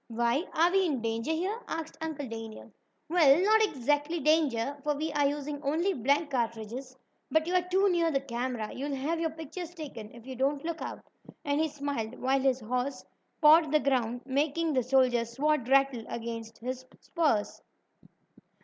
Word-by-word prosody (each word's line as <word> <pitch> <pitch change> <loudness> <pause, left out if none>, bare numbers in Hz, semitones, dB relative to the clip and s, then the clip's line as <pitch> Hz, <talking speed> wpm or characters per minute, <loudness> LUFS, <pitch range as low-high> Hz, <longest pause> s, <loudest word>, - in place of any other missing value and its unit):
"Why, 235 +7 0
are 335 +3 +4
we 385 +1 +3
in 285 -6 -1
danger 230 +6 -1
here?" 370 +8 -1
asked 320 0 -5
Uncle 310 -4 -4
Daniel. 225 -1 -8 0.4
"Well, 315 -3 +5
not 440 +2 +5
exactly 295 - 0
danger, 285 -4 +2
for 295 -1 0
we 310 +2 -2
are 290 -1 +3
using 290 0 -4
only 320 +7 +1
blank 280 +4 +1
cartridges. 240 +1 -3 0.3
But 315 0 +2
you 350 - -2
are 365 - +4
too 385 +2 +3
near 345 -3 +2
the 275 -4 +1
camera. 245 -4 -4
You'll 280 +2 -3
have 305 +5 -2
your 325 -1 0
pictures 320 +3 -8
taken 270 -10 -8
if 235 -1 -14
you 260 0 -7
don't 275 +3 0
look 335 -1 -3
out," - - -5 0.4
and 285 +1 +1
he 320 - +2
smiled, 280 -6 -4
while 265 +1 +1
his 260 -1 +1
horse 250 +4 -3 0.4
pawed 310 0 +7
the 305 - +4
ground, 245 -4 0
making 295 +4 0
the 260 - +3
soldier's 245 -2 +2
sword 295 -2 +1
rattle 270 -3 +3
against 230 -1 -6
his 255 +2 -5 0.2
spurs. 295 -12 0
280 Hz, 175 wpm, -29 LUFS, 245-315 Hz, 0.4 s, pawed